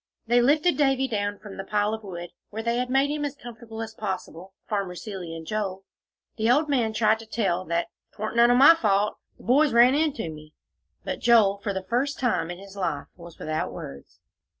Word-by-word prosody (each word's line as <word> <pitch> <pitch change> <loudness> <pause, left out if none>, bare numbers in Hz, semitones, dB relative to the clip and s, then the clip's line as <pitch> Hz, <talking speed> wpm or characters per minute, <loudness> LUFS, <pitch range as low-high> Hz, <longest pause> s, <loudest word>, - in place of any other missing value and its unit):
They 240 +1 +4
lifted 300 +7 +3
Davie 270 -2 +2
down 205 -3 -2
from 200 -2 -11
the 195 - -4
pile 210 +1 0
of 220 - -4
wood, 175 -3 -7 0.2
where 220 +2 -5
they 235 +1 0
had 250 0 -1
made 270 +2 +2
him 300 0 -2
as 285 -1 -3
comfortable 225 -3 -8
as 225 0 -8
possible, 190 -3 -6
Farmer 195 -4 -2
Seeley 180 -4 -7
and 165 0 -8
Joel; 195 -1 -3 0.5
the 220 +1 +1
old 295 +5 +4
man 245 -6 +1
tried 220 0 +2
to 225 - -11
tell 185 -5 -1
that 170 0 0 0.3
"'Twarn't 215 +2 -4
none 235 0 +6
o' 245 - +5
my 275 +6 +9
fault. 210 -8 +1 0.2
Th' - - -17
boys 275 +3 +4
ran 240 +2 +6
into 295 - 0
me," 155 0 -13 0.5
but - - -4
Joel, 210 -4 +4
for 205 - -2
the 190 -1 -4
first 260 +6 0
time 245 -9 0
in 175 - -5
his 195 +1 -12
life, 175 -7 -3
was 170 -1 -13
without 155 0 -3
words. 70 0 -10
220 Hz, 210 wpm, -25 LUFS, 190-245 Hz, 0.5 s, my